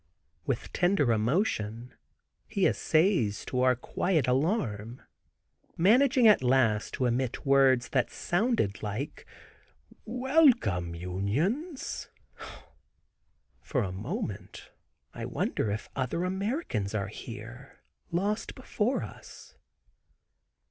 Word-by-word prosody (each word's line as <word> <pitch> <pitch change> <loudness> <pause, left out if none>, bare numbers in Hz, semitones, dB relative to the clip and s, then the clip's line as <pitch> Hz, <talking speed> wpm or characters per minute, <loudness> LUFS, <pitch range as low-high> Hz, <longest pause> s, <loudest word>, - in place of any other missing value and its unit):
With - - -3
tender 175 -8 +2
emotion 115 - -1 0.5
he - - 0
essays 155 - +2
to 125 0 +2
quiet 155 +4 0
our 125 - +3
alarm, 125 - -1 0.7
managing 245 - +5
at 210 - +6
last 125 -4 +2
to 130 - 0
emit 125 +2 -1
words 135 -2 +4
that 130 -5 +1
sounded 195 - 0
like 105 +7 -5 0.8
"Welcome, 245 - +2
Unions!" 140 - -2 1.5
For 130 -6 -1
a 95 - -3
moment 105 - -6 0.4
I - - -6
wonder 110 - -1
if 105 +1 -3
other 135 +6 -1
Americans 190 - -2
are 100 0 -1
here 115 +4 -10 0.3
lost 205 +6 -1
before 255 -1 -1
us. - - -12
130 Hz, 95 wpm, -29 LUFS, -, 1.5 s, at